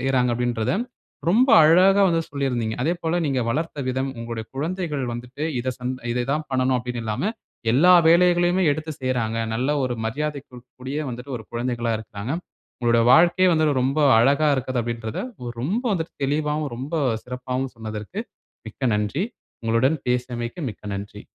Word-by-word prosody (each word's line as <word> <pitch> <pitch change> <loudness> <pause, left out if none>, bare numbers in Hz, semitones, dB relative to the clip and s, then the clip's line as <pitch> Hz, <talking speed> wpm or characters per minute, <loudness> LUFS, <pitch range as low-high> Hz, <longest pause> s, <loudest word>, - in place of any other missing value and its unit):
செய்றாங்க 130 -1 +2
அப்டின்றத, 120 -2 -1 0.6
ரொம்ப 245 +8 +4
அழகா 185 +5 +6
வந்து 165 -1 +1
சொல்லிருந்தீங்க. 125 -6 -1
அதே 160 +6 +2
போல 165 +1 0
நீங்க 135 -3 0
வளர்த்த 155 +3 -2
விதம், 130 +1 -1
உங்களுடைய 115 -1 -5
குழந்தைகள் 155 -1 -2
வந்துட்டு, 125 +4 -7 0.2
இத 130 - -2
சம் 125 +1 -3 0.2
"இத 120 0 -1
தான் 155 +1 -2
பண்ணணும்" 130 0 +2
அப்டின் 125 0 -4
இல்லாம 110 - -1 0.4
எல்லா 175 +8 +6 0.2
வேலைகளையுமே 175 +1 +4
எடுத்து 155 +2 -5
செய்றாங்க. 120 -3 -1 0.2
நல்ல 130 +5 0
ஒரு 125 - -1
மரியாதைக்கு 140 +1 -4 0.2
கூடிய 135 +4 -4
வந்துட்டு 125 +2 -6
ஒரு 110 - -9
குழந்தைகளா 120 -1 -1
இருக்காங்க. 110 +1 -7 0.5
உங்களோட 120 -1 +3
வாழ்க்கையே 175 +5 +5
வந்து 155 -1 +3 0.2
ரொம்ப 135 +4 0 0.2
அழகா 140 +6 +4
இருக்குது 130 -1 -1
அப்டின்றத 115 -1 -4 0.4
ரொம்ப 195 - -1
வந்துட்டு 165 -3 -3
தெளிவாவும், 150 +1 0
ரொம்ப 135 +6 -5 0.3
சிறப்பாவும் 125 +1 -4
சொன்னதற்கு 110 - -6 0.5
மிக்க 125 +3 -2
நன்றி. 105 - -1 0.4
உங்களுடன் 120 +7 +2
பேசியமைக்கு 125 +4 -2
மிக்க - - -14
நன்றி! 100 +1 -7
130 Hz, 145 wpm, -23 LUFS, 120-155 Hz, 0.6 s, அழகா